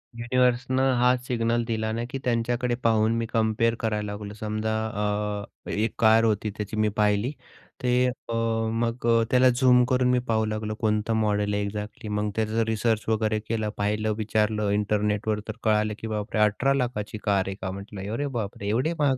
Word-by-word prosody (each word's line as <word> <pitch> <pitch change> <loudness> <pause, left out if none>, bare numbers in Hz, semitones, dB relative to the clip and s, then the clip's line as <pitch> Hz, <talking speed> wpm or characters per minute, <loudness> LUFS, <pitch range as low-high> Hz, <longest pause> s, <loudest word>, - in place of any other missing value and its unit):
युनिव्हर्सनं 125 +2 +1
हाच 125 0 +3
सिग्नल 115 -1 +1
दिला 110 -1 -1
ना, 115 +1 -2
की 135 - -4
त्यांच्याकडे 120 0 0
पाहून 110 0 +3
मी 115 - -1
कंपेअर 115 0 +2
करायला 105 -2 -1
लागलो. 105 0 -6
समजा 110 +1 -2
अ, 105 -1 -2 0.2
एक 110 +2 -1
कार 110 0 +5
होती, 110 -1 +1
त्याची 105 +1 -4
मी 110 0 +2
पाहिली 105 +4 +2 0.5
ते 125 -1 +2
अ, 125 -2 -5 0.4
मग 115 +1 -2
अ, 115 -1 +4
त्याला 130 0 +6
झूम 125 0 +5
करून 125 -1 +2
मी 125 - +3
पाहू 110 -1 +2
लागलो 110 0 -3
कोणता 110 0 0
मॉडेल 105 -1 +1
आहे 100 0 0
एक्झॅक्टली 105 +2 -5
मग 105 0 -1
त्याचं 110 +1 +1
रिसर्च 110 0 0
वगैरे 110 -1 +1
केलं, 110 -2 -1
पाहिलं, 105 +1 0
विचारलं 105 -1 0
इंटरनेटवर, 105 +1 0
तर 110 - -3
कळालं 105 0 +2
की 110 - -5
बापरे! 105 0 -3
18,00,000 125 +2 +1
ची 110 - -7
कार 100 -2 +2
आहे 95 - -3
का, 95 0 -3
म्हटलं 100 +1 -7
अरे 145 +4 -1
बापरे! 105 -5 -4
एवढे 125 +10 +1
महाग 140 -3 +3
110 Hz, 175 wpm, -26 LUFS, 105-120 Hz, 0.5 s, त्याला